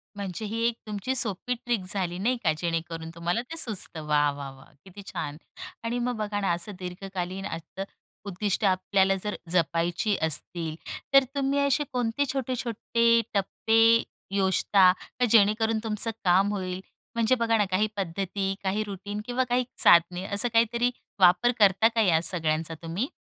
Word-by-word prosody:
म्हणजे 200 +1 -5
ही 225 +2 -3
1 235 - -1
तुमची 210 +5 -3
सोपी 235 0 +3
ट्रिक 240 -4 -2
झाली 180 -3 -2
नाही 245 +6 +1
का? 160 - +3
जेणेकरून 165 -1 -3
तुम्हाला 175 +6 -1
ते 330 - -6
सुचतं. 200 - -3
वा! 150 -1 +3
वा! 140 -1 -7
वा! 135 0 -16 0.2
किती 195 +1 -11
छान! 150 -1 -4 0.5
आणि 235 +1 -2
मग 245 0 -1
बघा 210 -1 -2
ना, 195 - +1
असं 175 +5 -4
दीर्घकालीन 185 0 -5
असतं-उद्दिष्टं 195 +4 -4
आपल्याला 190 +1 +2
जर 210 0 -3 0.2
जपायची 170 +4 +1
असतील, 160 +1 -1 0.4
तर 275 0 +8
तुम्ही 280 0 +1
असे 280 +1 +2
कोणते 245 +3 0
छोटे-छोटे 235 -2 +1
टप्पे 220 +3 +1 0.6
योजता 190 -1 +4 0.3
का 250 - +4
जेणेकरून 220 +1 +3
तुमचं 225 +1 -1
काम 190 +2 +3
होईल? 185 -2 -4 0.4
म्हणजे 230 +2 +3
बघा 230 -2 +1
ना, 210 - +2
काही 200 +4 +2
पद्धती, 195 +1 -2
काही 195 +3 0
रुटीन 205 0 -6
किंवा 245 +2 0
काही 250 0 0 0.2
साधने 175 +2 +5
असं 200 +4 +2
काहीतरी 235 +2 +2 0.3
वापर 185 +6 +5
करता 200 +1 +5
का 225 - +3
या 170 -6 +3
सगळ्यांचा 160 -2 -1
तुम्ही? 170 +10 -2
200 Hz, 155 wpm, -26 LUFS, 180-230 Hz, 0.6 s, तर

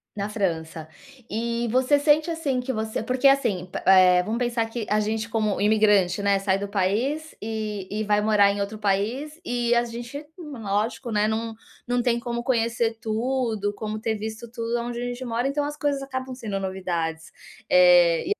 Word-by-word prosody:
Na 200 -1 -2
França. 165 -6 -3 0.4
E 235 +2 -2
você 260 +3 +3
sente, 300 +3 +3
assim, 310 -6 -1
que 255 +1 -3
você 220 -1 -3
porque, 255 +4 +3
assim, 220 -10 +1
pa - - -4
eh, 185 -1 +7
vamos 225 +5 -2
pensar 240 -2 0
que 225 -1 -4
a 210 +1 +2
gente, 220 +1 -2
como 215 -3 0
imigrante, 205 -3 +3
né, 200 0 +3
sai 195 0 0
do 200 - -3
país 230 +11 -1
e 215 -3 -4
e 215 +1 -2
vai 210 0 +2
morar 210 -2 +4
em 200 - -4
outro 200 +2 -3
país. 220 - -1
E 240 -1 0
a 240 0 +3
gente, 240 +5 -7
lógico, 235 - -3
né, 210 0 +2
num 225 +1 -2 0.3
não 245 0 +1
tem 235 -1 +1
como 235 0 -4
conhecer 235 -2 0
tudo, 225 -2 -1
como 215 +1 -5
ter 220 0 -1
visto 220 +2 -6
tudo 230 0 -2
onde 240 0 -4
a - - -2
gente 245 +1 -5
mora, 240 +1 -1
então 285 +1 -1
as 295 +1 -4
coisas 290 -2 -1
acabam 260 -1 -5
sendo 215 -6 -4
novidades, 170 -4 -3 0.4
eh, 175 -2 +6
225 Hz, 185 wpm, -24 LUFS, 200-245 Hz, 0.4 s, eh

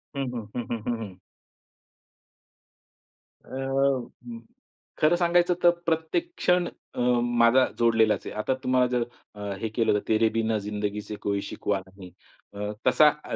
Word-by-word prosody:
हं, 135 -2 -2
हं. 115 -4 -5
हं, 120 - -2 0.2
हं, 120 - 0
हं. 95 -4 -8 2.3
अ, 135 -1 0 0.9
खरं 155 +2 +4
सांगायचं 175 0 +3
तर 175 - +8 0.2
प्रत्येक 165 - -1
क्षण 180 - +2 0.3
अ, - - -5 0.2
माझा 120 +1 +4
जोडलेलाच 115 -2 +3
आहे. - - -6
आता 110 +5 0
तुम्हाला 130 0 +3
जर 125 -1 +1 0.3
अ, 105 - -10 0.2
हे 110 - -2
केलं 115 0 +1
तर 105 - +2
"तेरे 110 0 +3
बिना 110 -1 +1
जिंदगी 105 0 -3
से 105 0 -7
कोई 100 -1 -1
शिकवा 100 0 -2
नही" 95 -1 -12 0.4
अ, 105 +1 -4 0.2
तसा 150 - +7
अ, - - -4
120 Hz, 145 wpm, -26 LUFS, 105-135 Hz, 2.3 s, तर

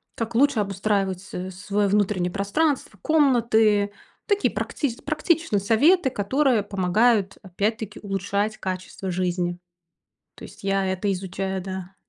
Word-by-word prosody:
как 230 0 -4
лучше 280 -1 +4
обустраивать 195 -2 -1
с 185 -1 -6
свое 200 +2 -1
внутреннее 190 -3 +1
пространство, 210 - -1
комнаты, 225 -8 +3 0.3
такие 410 -1 +1
практич 255 -6 -2
практичные 310 - +1
советы, 265 - +4
которые 255 +1 +1
помогают, 200 +2 +2
опять-таки, 210 +3 -3
улучшать 200 +2 -2
качество 185 0 -5
жизни. 175 -1 -1 0.8
То - - -13
есть - - -15
я 195 0 +1
это 190 +2 -1
изучаю, 190 0 -3
да. 190 0 -7
200 Hz, 120 wpm, -24 LUFS, 190-230 Hz, 0.8 s, лучше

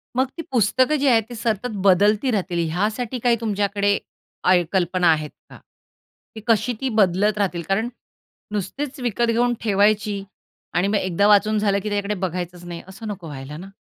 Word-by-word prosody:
मग 260 +1 +3
ती - - -3
पुस्तकं 255 +4 +3
जी 285 -1 +1
आहेत 230 -4 +4
ती 240 - -7
सतत 225 0 -1 0.2
बदलती 205 +7 +4
राहतील 175 -5 -1
यासाठी 215 +8 -2
काही 240 0 +3
तुमच्याकडे 205 -1 +1 0.5
आय 180 -1 +4
कल्पना 180 -1 +1
आहेत 155 -1 -1 0.2
का? - - -12 0.8
की 220 - -7
कशी 235 +2 +2
ती 265 - 0
बदलत 205 -1 +2
राहतील? 180 -4 0
कारण 220 +5 +1 0.6
नुसतीच 255 +8 -4
विकत 240 -1 0
घेऊन 240 +1 +2
ठेवायची 205 -1 +2 0.5
आणि 180 +3 +2
मग 210 - 0
एकदा 190 +1 +1
वाचून 210 +1 +4
झालं 200 -1 +2
की 210 - -4
त्याच्याकडे 205 0 -1
बघायचंच 180 -1 -4
नाही 175 -1 -7
असं 210 +4 -9
नको 200 -5 -6
व्हायला 145 0 -8
ना. 185 +4 -9
205 Hz, 170 wpm, -22 LUFS, 185-225 Hz, 0.8 s, आहेत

